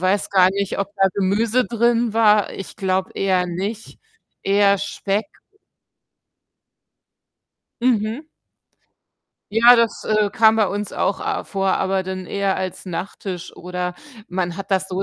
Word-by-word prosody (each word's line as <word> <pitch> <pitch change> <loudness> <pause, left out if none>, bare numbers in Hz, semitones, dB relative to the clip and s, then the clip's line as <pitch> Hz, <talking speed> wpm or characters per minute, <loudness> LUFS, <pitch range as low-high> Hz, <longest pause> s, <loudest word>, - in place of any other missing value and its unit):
weiß 190 +2 0
gar 185 -2 +5
nicht, 200 0 -2
ob 200 0 -1
da 195 0 +4
Gemüse 220 +6 +1
drin 235 -1 +1
war, 210 -2 +4
ich 195 - -8
glaube 190 -1 -1
eher 185 -2 +1
nicht, 200 +6 -5 0.4
eher 200 0 +3
Speck. 200 +1 -2 2.6
Mhm. 230 +1 +1 1.3
Ja, 235 +2 +8
das, 230 -1 0
äh, 215 -1 +1
kam 220 -2 +4
bei 215 -2 +3
uns 205 0 -4
auch 200 - 0
a - - -2
vor, 195 -1 -1
aber 190 0 0
dann 185 0 -5
eher 200 +1 -1
als 185 0 -5
Nachtisch 180 0 -6
oder 180 0 -4 0.3
man 180 -1 -2
hat 195 - -7
das 190 0 +1
so 190 +1 -2
195 Hz, 135 wpm, -21 LUFS, 190-215 Hz, 2.6 s, Ja